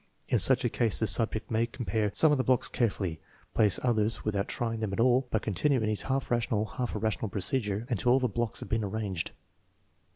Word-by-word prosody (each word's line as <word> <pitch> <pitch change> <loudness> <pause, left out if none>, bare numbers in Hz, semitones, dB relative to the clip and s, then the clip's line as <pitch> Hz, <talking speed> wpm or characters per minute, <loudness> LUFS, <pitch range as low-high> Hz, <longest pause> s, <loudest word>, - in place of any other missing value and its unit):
In - - +3
such - - +6
a - - +2
case 115 -3 +2
the 110 - +1
subject 110 +1 +2
may 115 +1 +1
compare 110 -3 -2
some 155 - +4
of 145 - +2
the - - +2
blocks 130 -1 +2
carefully, 95 -8 -2 0.3
place 105 -4 +3
others 115 -2 0
with 105 -1 -1
out 100 0 -1
trying 115 -2 -3
them 110 -3 -3
at 100 - -4
all, 125 +2 +3
but 110 - -1
continue 130 - +1
in 110 -1 -1
his 105 - -1
half 135 -1 -2
rational, 115 -3 0
half 125 +1 -5
irrational 110 0 -2
procedure 105 +2 -2
until 120 0 +1
all 130 - +4
the 130 - 0
blocks 120 0 -3
have - - -8
been 110 -1 0
arranged. 100 -4 -3
110 Hz, 220 wpm, -29 LUFS, 105-120 Hz, 0.3 s, such